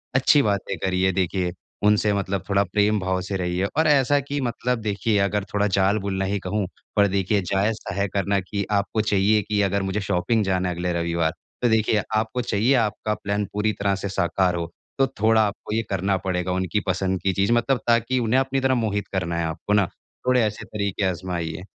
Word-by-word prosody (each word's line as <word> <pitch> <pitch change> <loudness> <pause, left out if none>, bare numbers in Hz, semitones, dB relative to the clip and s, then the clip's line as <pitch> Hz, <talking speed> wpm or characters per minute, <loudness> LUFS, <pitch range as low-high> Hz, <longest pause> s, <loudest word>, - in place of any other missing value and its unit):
अच्छी 135 +2 +5
बातें 100 -4 -1
करिए। 95 0 +1
देखिए 90 -1 -1 0.3
उनसे 105 0 +4
मतलब 100 -1 -2
थोड़ा 100 0 +3
प्रेम 105 +2 +1
भाव 95 0 -1
से 95 - -4
रहिए 90 +1 -1
और 160 - +4
ऐसा 145 -1 +4
कि 140 +1 -4
मतलब 125 0 -1
देखिए 105 0 0
अगर 100 +1 +1
थोड़ा 105 0 +2
जाल 95 +2 +2
बुनना 95 -1 -2
ही 100 +1 -1
कहूँ, 100 -1 -2 0.3
पर 100 -1 +5
देखिए 100 +1 +1
जायज़-सा 100 0 0
है 100 0 0
करना 100 0 +1
कि 100 +1 -3
आपको 100 +2 +1
चाहिए 105 0 +2
कि 105 +1 -1
अगर 100 0 +1
मुझे 95 +2 -1
शॉपिंग 100 +4 +1
जाना 95 -1 0
है 90 - -3
अगले 90 +1 -2
रविवार 85 -1 0 0.3
तो 120 - +3
देखिए 110 -1 +2
आपको 110 +3 0
चाहिए 115 +2 +1
आपका 110 -2 0
प्लान 100 +1 -2
पूरी 105 +1 +1
तरह 100 -1 +2
से 100 0 -4
साकार 90 -1 +1
हो। 85 -1 -3 0.3
तो 135 - +4
थोड़ा 110 0 +5
आपको 100 +1 -6
ये 115 - +2
करना 95 0 0
पड़ेगा 90 -1 -2
उनकी 95 +3 0
पसंद 95 0 0
की 95 +1 +1
चीज़ 100 +4 +1
मतलब 120 +3 +2
ताकि 115 +2 +2
उन्हें 120 +2 +2
अपनी 135 0 0
तरफ़ 130 0 +2
मोहित 105 -3 -1
करना 85 -3 -1
है 85 - 0
आपको 80 +6 -3
ना 100 -2 +4 0.4
थोड़े 125 -1 +4
ऐसे 105 -1 -3
तरीके 100 -1 -3
आजमाइए। 90 -2 -3
100 Hz, 200 wpm, -23 LUFS, 95-110 Hz, 0.4 s, अच्छी